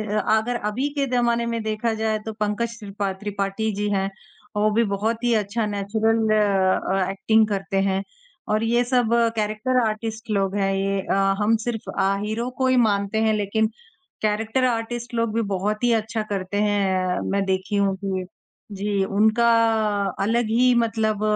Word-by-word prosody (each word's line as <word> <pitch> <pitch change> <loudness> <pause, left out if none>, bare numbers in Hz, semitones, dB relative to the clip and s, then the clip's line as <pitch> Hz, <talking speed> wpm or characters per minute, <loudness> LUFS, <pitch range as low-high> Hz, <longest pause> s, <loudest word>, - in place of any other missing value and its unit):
अ, - - +3 0.2
अगर 240 +3 -1
अभी 260 +7 -1
के 280 - +2
ज़माने 235 -1 +2
में 230 -1 -2
देखा 220 +1 -1
जाए 220 0 -1
तो 220 - -4
पंकज 215 +2 -2
त्रिपा 200 -2 -3
त्रिपाठी 205 +2 -2
जी 205 +1 -1
हैं, 195 -1 0 0.5
वो 210 +1 +3
भी 230 +2 +3
बहुत 220 +3 -1
ही 240 -1 +2
अच्छा 215 +2 -1
नेचुरल 220 +2 0 0.8
एक्टिंग 215 +3 +3
करते 195 -1 -2
हैं 195 0 0 0.5
और 215 +1 +1
ये 240 +2 +2
सब 245 -2 +1 0.3
कैरेक्टर 215 +4 0
आर्टिस्ट 220 +1 -4
लोग 195 -1 0
हैं। 195 -1 +1
ये 195 0 0
अ, - - -2 0.3
हम 215 +2 +3
सिर्फ 235 -3 -2 0.2
अ, 195 +1 +2
हीरो 220 +3 -2
को 260 - +1
ही 260 - +3
मानते 205 -3 +2
हैं 220 -1 +3
लेकिन 215 +1 +1 0.5
कैरेक्टर 220 +4 0
आर्टिस्ट 240 0 -3
लोग 230 -2 0
भी 230 - +1
बहुत 210 +4 -1
ही 240 - +4
अच्छा 220 0 -1
करते 195 0 -3
हैं। 190 -3 +1
मैं 200 0 +1
देखी 190 +2 -1
हूँ 200 -1 +2
कि 190 -2 -2 0.5
जी 200 0 0
उनका 220 +4 +3 0.7
अलग 230 +3 +1
ही 250 +3 +4
मतलब 220 -2 0
215 Hz, 165 wpm, -23 LUFS, 200-230 Hz, 0.8 s, ही